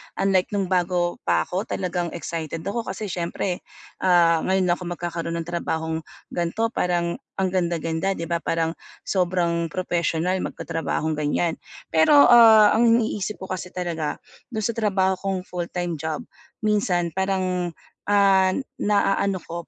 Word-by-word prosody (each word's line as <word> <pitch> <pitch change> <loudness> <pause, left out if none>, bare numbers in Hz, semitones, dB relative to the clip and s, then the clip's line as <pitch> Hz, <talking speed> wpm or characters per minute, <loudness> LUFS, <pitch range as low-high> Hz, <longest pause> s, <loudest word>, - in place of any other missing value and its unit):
Unlike 195 +1 +1
nung 195 -2 -1
bago 175 -1 +1
pa - - +3
ako, 190 +4 -3
talagang 175 -3 -2
excited 165 -1 -5
ako 205 +4 -2
kasi 210 -3 -4
siyempre, 175 +1 -2 0.4
ah, 170 -3 +4
ngayon 190 +2 +1
lang - - +3
ako 180 - -6
magkakaroon 170 -1 -4
ng 170 - -2
trabahong 160 -2 -2 0.3
ganito, 195 +7 -1
parang 175 -3 -1 0.2
ang 190 -1 0
ganda-ganda, 170 0 -1
'di 165 - -5
ba? 170 0 -1
Parang 165 -1 0 0.3
sobrang 175 -3 0
propesyonal 175 +1 -1
yung - - -2
magtatrabahong 160 -1 -3
ganiyan, 160 +3 0 0.3
pero, 160 - +5
ah, 220 -3 +8
ang 235 +2 +4
iniisip 220 -3 +1
ko 190 - -7
kasi 185 -1 -4
talaga 170 -4 -2 0.3
dun 220 -4 -4
sa 230 - +1
trabaho 190 -4 +1
kong 195 -2 -2
full-time 175 -3 -4
job, 160 -1 -3 0.4
minsan 190 -5 +1
parang, 185 -2 -1 0.3
ah, 195 -2 +4 0.2
naano 200 -2 +1
ko, 170 0 -7
180 Hz, 145 wpm, -23 LUFS, 170-195 Hz, 0.4 s, ah